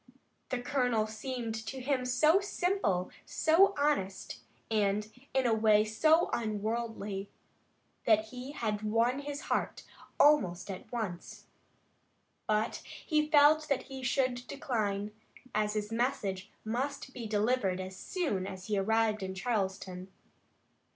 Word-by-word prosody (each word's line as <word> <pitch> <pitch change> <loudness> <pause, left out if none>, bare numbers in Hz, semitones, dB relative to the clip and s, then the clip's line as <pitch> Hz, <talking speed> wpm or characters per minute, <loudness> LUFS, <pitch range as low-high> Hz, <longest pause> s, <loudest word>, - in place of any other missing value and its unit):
The 255 - -1
colonel 245 -4 +1
seemed 230 +1 -4
to 265 - -4
him 255 0 0
so 305 +8 +4
simple, 360 - 0
so 375 +6 +4
honest 285 -10 -1 0.3
and, 210 -1 +1 0.2
in 265 -1 +1
a 235 - +3
way, 215 -1 +4
so 310 +10 +3
unworldly, 215 -2 -2 0.8
that 220 -1 +3
he 255 +4 -7
had 215 -6 -2
won 230 +5 +1
his 285 0 -5
heart - - -2 0.4
almost 200 -11 +4
at 185 - -9
once. 210 -8 -5 1.0
But 215 +1 +1
he 305 -2 -1
felt 305 +1 +6
that 280 - +1
he 265 -1 -8
should 250 -1 0
decline, 210 -6 -2 0.4
as 210 0 0
his 210 0 -2
message 225 -6 -1 0.2
must 265 +4 -3
be 235 -3 -5
delivered 210 -3 +1
as 185 0 -6
soon 205 - -2
as 190 -1 -7
he 205 -1 0
arrived 220 +1 +2
in 190 0 -4
Charleston. 190 -3 -2
225 Hz, 125 wpm, -31 LUFS, 205-270 Hz, 1.0 s, felt